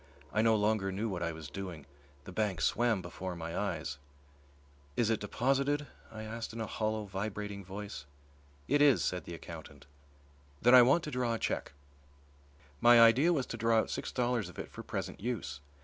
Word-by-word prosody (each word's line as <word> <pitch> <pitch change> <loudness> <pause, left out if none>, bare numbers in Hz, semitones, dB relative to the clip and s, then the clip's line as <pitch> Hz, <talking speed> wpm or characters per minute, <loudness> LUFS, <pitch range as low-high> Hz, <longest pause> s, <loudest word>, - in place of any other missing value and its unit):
I 110 - +3
no 110 0 +4
longer 105 -2 +1
knew 100 +4 -2
what 90 -3 -4
I 85 -1 -1
was 80 -2 -8
doing. 85 -2 -7 0.4
The 95 - -9
bank 95 -2 -1
swam 115 -6 +2
before 90 +1 -5
my 85 0 -5
eyes. 75 +1 -3 1.0
"Is 115 -2 +3
it 110 - +1
deposited?" 135 +7 0 0.3
I 110 -1 -7
asked 110 +1 -5
in 115 - -6
a 110 - -1
hollow, 110 0 -2
vibrating 100 0 -4
voice. 95 -5 -7 0.6
"It 145 +2 +3
is," 145 -3 +5
said 90 0 -2
the 85 - -6
accountant. 85 -1 -10 0.7
"Then 120 +2 +5
I 125 - +11
want 135 +8 +4
to 150 - -5
draw 125 -2 0
a - - -2
cheque." - - -2 1.1
My 120 0 +7
idea 120 +9 +6
was 140 -7 +1
to 115 - -6
draw 115 0 +3
out 110 - +1
six - - -3
dollars 120 -6 0
of 90 - -14
it - - -6
for - - -8
present - - -5
use. 95 - -4
110 Hz, 185 wpm, -32 LUFS, 95-120 Hz, 1.1 s, I